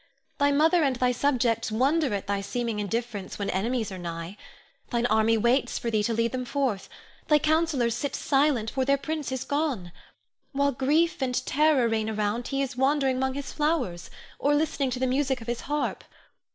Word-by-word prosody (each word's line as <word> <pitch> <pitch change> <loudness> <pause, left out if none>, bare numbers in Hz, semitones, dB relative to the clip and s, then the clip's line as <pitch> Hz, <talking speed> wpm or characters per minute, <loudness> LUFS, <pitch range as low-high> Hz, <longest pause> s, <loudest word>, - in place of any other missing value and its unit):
Thy 285 0 +4
mother 320 +4 +4
and 270 -3 +2
thy 250 0 +2
subjects 240 -4 +1
wonder 275 +6 +2
at 200 - -4
thy 200 0 -1
seeming 225 +2 -3
indifference 210 -1 -3
when 200 -1 -2
enemies 220 +3 -1
are 190 - -6
nigh. 170 +1 -6 0.5
Thine 240 -1 0
army 220 0 +3
waits 240 +5 +1
for 235 - -3
thee 215 -1 +2
to 230 - 0
lead 230 0 +1
them 255 -1 -3
forth; 250 -6 -2 0.4
thy 300 - +5
councillors 305 -6 +1
sit 265 +4 -3
silent, 270 -6 +1
for 265 - 0
their 275 +1 +3
prince 305 0 -4
is 260 -1 -2
gone. 285 - -2 0.6
While 280 +1 +2
grief 300 +6 +1
and 255 -1 0
terror 295 -4 +3
reign 220 -1 0
around, 215 +2 -1
he 275 0 0
is 270 -1 -5
wandering 265 0 +2
'mong 265 0 -1
his 280 0 -5
flowers, 295 - -1 0.3
or 290 +1 +2
listening 295 -3 0
to 250 0 -3
the 260 - +1
music 265 0 0
of 225 - -10
his 240 0 -3
harp. 295 0 -1
255 Hz, 190 wpm, -26 LUFS, 225-285 Hz, 0.6 s, thy